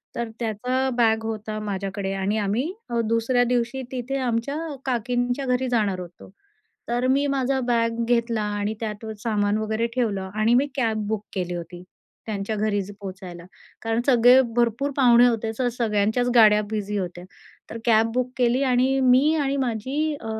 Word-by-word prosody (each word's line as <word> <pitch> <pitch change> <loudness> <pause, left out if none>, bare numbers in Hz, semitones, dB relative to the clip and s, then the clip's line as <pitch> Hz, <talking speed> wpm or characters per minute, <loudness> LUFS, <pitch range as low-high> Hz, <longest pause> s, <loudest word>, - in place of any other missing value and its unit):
तर 235 -1 -3
त्याचा 250 +4 -1
बॅग 225 -2 +2
होता 215 -1 -4
माझ्याकडे 195 -1 -3
आणि 195 +2 -1
आम्ही 220 - -1 0.2
अ, 235 -1 -1
दुसऱ्या 230 +2 +1
दिवशी 245 +1 -1
तिथे 260 +1 -3
आमच्या 245 +2 -1
अ, 305 -3 -6
काकींच्या 245 +1 -1
घरी 255 0 0
जाणार 210 -6 0
होतो. 175 -1 -11 0.6
तर 245 +2 0
मी 275 +2 +2
माझा 270 -1 0
बॅग 230 -1 +1
घेतला 235 -2 +1
आणि 205 +1 -2
त्यात 220 0 -5
सामान 205 -1 0
वगैरे 220 +1 -1
ठेवलं 200 -7 -1
आणि 215 +2 +2
मी 265 +4 +3
कॅब 220 -5 0
बुक 215 -1 -2
केली 180 -2 -3
होती, 175 +1 -7 0.4
त्यांच्या 210 0 -3
घरी 205 -1 0
ज 200 +2 -9
पोहचायला. 185 -3 -8 0.4
कारण 225 +1 0
सगळे 250 0 +6 0.2
भरपूर 240 +4 +1
पाहुणे 245 -3 +6
होते, 225 -1 -1
तर 255 -2 +1
सगळ्यांच्याच 220 +1 +1
गाड्या 215 -3 +6
बिझी 210 -1 -3
होत्या. 180 -1 -5 0.5
तर 230 - -6
कॅब 225 -1 +3
बुक 255 0 0
केली 250 +2 +2
आणि 260 +1 +2
मी 260 +4 +4
आणि 275 0 0
माझी 265 +5 -1
अ, - - -9
230 Hz, 165 wpm, -24 LUFS, 210-250 Hz, 0.6 s, सगळे